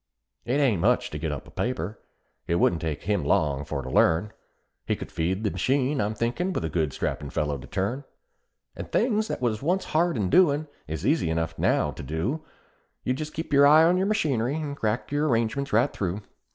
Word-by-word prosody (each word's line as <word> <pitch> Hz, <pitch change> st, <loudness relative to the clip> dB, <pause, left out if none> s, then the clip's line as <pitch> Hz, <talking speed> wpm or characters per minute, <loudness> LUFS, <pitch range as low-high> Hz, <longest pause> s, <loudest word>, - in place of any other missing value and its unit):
"It 125 Hz, +5 st, +1 dB
ain't 120 Hz, -, +2 dB
much 120 Hz, +6 st, +2 dB
to 75 Hz, -, -5 dB
get 80 Hz, 0 st, -2 dB
up 70 Hz, -, -6 dB
a -, -, -14 dB
paper 110 Hz, -4 st, -3 dB, 0.5 s
it 85 Hz, -, +1 dB
wouldn't 85 Hz, -1 st, +2 dB
take 80 Hz, -3 st, -3 dB
him 100 Hz, 0 st, 0 dB
long 70 Hz, -2 st, +1 dB
for 70 Hz, -2 st, -4 dB
to -, -, -6 dB
learn; 85 Hz, +7 st, +3 dB, 0.5 s
He -, -, 0 dB
could -, -, -8 dB
feed 90 Hz, +5 st, -1 dB
the 105 Hz, -, 0 dB
machine, 130 Hz, -, +1 dB
I'm 105 Hz, +1 st, -1 dB
thinkin', 125 Hz, -, -1 dB
with 80 Hz, -, -2 dB
a -, -, -2 dB
good 80 Hz, -3 st, 0 dB
strappin' 70 Hz, +2 st, -3 dB
fellow 75 Hz, -1 st, -1 dB
to -, -, -11 dB
turn. 120 Hz, +9 st, -2 dB, 0.7 s
And -, -, -8 dB
things 220 Hz, -3 st, +2 dB
that 130 Hz, -, -4 dB
was 110 Hz, -3 st, 0 dB
once 180 Hz, +6 st, 0 dB
hard 170 Hz, -1 st, +1 dB
in 95 Hz, -4 st, -1 dB
doin', 155 Hz, -4 st, +4 dB, 0.2 s
is 80 Hz, +4 st, -4 dB
easy 140 Hz, -, +2 dB
enough 80 Hz, 0 st, -1 dB
now -, -, +2 dB
to -, -, -9 dB
do; 105 Hz, -, -2 dB, 0.6 s
Just 150 Hz, +4 st, -2 dB
keep 160 Hz, -1 st, -4 dB
your 140 Hz, 0 st, +7 dB
eye 155 Hz, +2 st, +7 dB
on 170 Hz, +2 st, +4 dB
your 190 Hz, +2 st, +1 dB
machinery, 140 Hz, -, +1 dB
and 150 Hz, -3 st, -3 dB
crack 110 Hz, -1 st, -2 dB
your 145 Hz, +1 st, +1 dB
arrangements 120 Hz, +2 st, 0 dB
right 120 Hz, +6 st, +3 dB
through. 95 Hz, +2 st, -3 dB
115 Hz, 205 wpm, -26 LUFS, -, 0.7 s, your